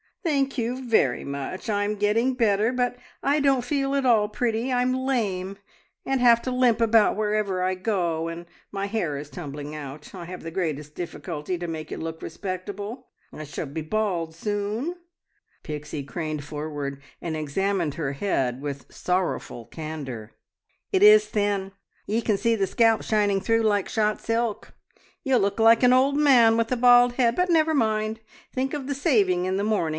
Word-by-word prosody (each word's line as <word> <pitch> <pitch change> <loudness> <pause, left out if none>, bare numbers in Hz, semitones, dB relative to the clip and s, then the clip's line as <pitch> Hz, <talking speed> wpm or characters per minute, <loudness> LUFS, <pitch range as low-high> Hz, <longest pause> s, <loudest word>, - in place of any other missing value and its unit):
"Thank 275 -5 0
you 250 +2 -2
very 135 - +2
much. 140 - -5
I 205 -1 +1
am 210 +1 -1
getting 220 +5 +1
better, 220 -1 +2
but 245 -1 0 0.3
I 285 +2 +2
don't 275 -3 +2
feel 275 +1 -1
at 275 -1 0
all 220 -4 +4
pretty. 230 +2 -1
I'm 250 0 +2
lame, 210 -8 -1 0.5
and 270 -1 0
have 235 -1 +5
to 255 - -2
limp 250 -2 +3
about 225 -2 +4
wherever 210 -3 0
I 185 0 +1
go, 180 -4 -1
and 165 +1 -6 0.3
my 195 0 -3
hair 200 -9 -2
is 145 +1 -7
tumbling 145 -3 -7
out. 150 0 -8
I 180 -3 -7
have 180 +1 -8
the 165 - -6
greatest 155 -5 -3
difficulty 165 0 -5
to 175 0 -5
make 155 -2 -6
it - - -5
look 160 0 -5
respectable. 200 - -6 0.3
I 155 - -7
shall 150 +2 -5
be 150 +3 -5
bald 170 -2 -2
soon!" 210 - -2 0.7
Pixie 150 -1 -5
craned 155 0 -4
forward 145 -2 -5 0.2
and 165 -2 -4
examined 160 +1 -1
her 145 -4 -2
head 135 -6 -1
with 140 -2 -6
sorrowful 180 -9 -2
candour. 140 -9 -7 0.6
"It 380 - +2
is 425 0 +8
thin! 205 -2 -1 0.3
Ye 220 +3 0
can 215 -3 +1
see 230 +3 +2
the 195 -3 0
scalp 225 +2 +3
shining 205 -2 +1
through 225 +2 +2
like 205 -3 +1
shot 215 -2 0
silk. 230 -1 -2 0.5
You'll 265 -3 +3
look 200 +2 0
like 225 +1 +6
an 250 0 +6
old 270 +2 +3
man 245 -6 +5
with 230 +1 0
a 255 - +1
bald 245 0 +6
head; 245 -2 +2
but 360 0 +1
never 320 -2 +3
mind! 220 -4 0 0.3
Think 265 +2 -1
of 285 -3 -5
the 280 +1 -2
saving 205 - +2
in 185 +1 0
the 200 - -1
morning! 210 -6 +1
205 Hz, 180 wpm, -25 LUFS, 165-240 Hz, 0.7 s, is